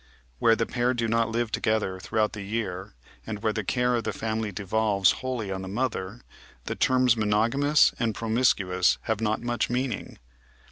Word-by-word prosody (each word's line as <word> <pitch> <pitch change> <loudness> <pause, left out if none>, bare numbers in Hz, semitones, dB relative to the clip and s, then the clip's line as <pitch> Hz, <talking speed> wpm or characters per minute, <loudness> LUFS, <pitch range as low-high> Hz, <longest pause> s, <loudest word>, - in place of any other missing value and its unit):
Where 115 -1 +5
the 115 - 0
pair 125 +2 0
do 115 -1 -1
not 115 0 +1
live 115 0 -1
together 105 -5 0
throughout 110 +2 0
the 105 - -6
year, 100 -2 -4 0.3
and 110 -1 -5
where 110 -1 +1
the 110 - -2
care 125 +4 +1
of 120 -1 0
the 110 - -2
family 110 +1 -3
devolves 100 0 +2
wholly 125 -6 -3
on 95 0 -3
the 95 - -7
mother, 105 0 -3 0.4
the - - -2
terms 130 -2 +3
monogamous 115 +8 +3
and 115 -3 0
promiscuous 105 -6 +2
have 110 -1 -2
not 110 -1 0
much 120 0 -1
meaning. 125 -2 -3
110 Hz, 175 wpm, -26 LUFS, 105-120 Hz, 0.4 s, Where